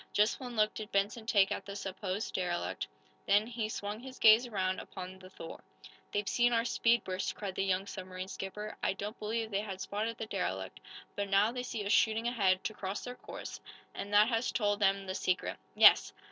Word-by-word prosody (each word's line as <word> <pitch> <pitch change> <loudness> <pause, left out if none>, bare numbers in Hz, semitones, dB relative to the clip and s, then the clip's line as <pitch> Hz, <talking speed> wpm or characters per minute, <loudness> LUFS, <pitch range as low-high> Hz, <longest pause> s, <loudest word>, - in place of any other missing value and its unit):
Just 210 +2 +3
one 250 -3 -6
look 215 -1 +3
did 215 -1 -7
Benson 210 +3 0
take 200 -4 +4
at - - -2
the 200 - -7
supposed 195 +1 -4
derelict. 175 -2 -2 0.4
Then 205 +2 +5
he 230 -2 -3
swung 205 0 -4
his 260 +1 -10
gaze 225 +3 +7
around 190 -4 -1
upon 185 0 -8
the 185 0 -12
"Thor." 165 -3 -9 0.5
"They've 205 0 -1
seen 240 0 +3
our 230 0 +2
speed 235 0 +3
burst," 185 0 -3
cried 200 -3 -4
the 195 - -1
young 190 0 +1
submarine 185 -1 -6
skipper. 210 +2 -6
"I - - +1
don't 205 +4 -6
believe 220 +1 -2
they 200 0 +1
had 195 -3 -6
spotted 220 +4 -3
the 225 - -4
derelict, 95 - -3 0.4
but 200 -1 -2
now 200 +3 +4
they 250 0 -3
see 230 -4 -4
us 200 - 0
shooting 225 +1 +3
ahead, 195 -6 +2
to 215 - -2
cross 195 -1 -4
their 245 - -5
course, - - -8 0.3
and 200 - -6
that 205 +1 +6
has 230 0 0
told 205 -3 +1
them 195 -1 +2
the 185 - -3
secret. 185 -1 -1 0.2
Yes! - - +7
205 Hz, 205 wpm, -32 LUFS, 190-225 Hz, 0.5 s, gaze